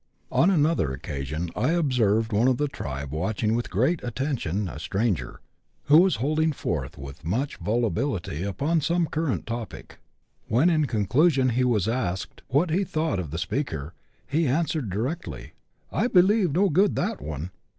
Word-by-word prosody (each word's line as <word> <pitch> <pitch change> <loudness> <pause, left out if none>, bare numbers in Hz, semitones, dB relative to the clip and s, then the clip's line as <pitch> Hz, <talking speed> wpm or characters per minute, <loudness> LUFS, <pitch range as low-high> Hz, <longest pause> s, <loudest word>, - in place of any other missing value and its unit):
On 175 - +4
another 160 - +2
occasion 70 +5 -4
I 130 +9 +1
observed 115 -9 +2
one 110 +5 +3
of 130 -2 +3
the 145 - +1
tribe 70 - -5
watching 105 +7 -1
with 120 +1 -1
great 130 - +1
attention 120 - -2
a 80 - -7
stranger, 95 - -2 0.4
who 150 +3 +7
was 185 -2 +4
holding 155 +5 +1
forth - - -3
with 70 -1 -9
much 120 - -2
volubility 105 - -1
upon 140 - 0
some 170 +3 +1
current 160 -3 -2
topic. 115 -3 -7 0.5
When, 140 +11 +3
in 155 -2 +2
conclusion, 130 - +3
he 125 +2 +1
was 110 -6 +2
asked 105 -7 -2
what 155 +5 +2
he 185 +5 +2
thought 155 - -1
of 85 -5 -4
the 80 - -4
speaker, 85 - -3 0.3
he 155 +2 +1
answered 155 -3 0
di 95 - -3
rectly, 140 +11 -4 0.2
" - - -44
I - - +1
believe 190 -3 +4
no 190 +6 +3
good 190 +5 +3
that 210 +3 -2
one." 80 +4 -5
125 Hz, 165 wpm, -25 LUFS, 95-155 Hz, 0.5 s, who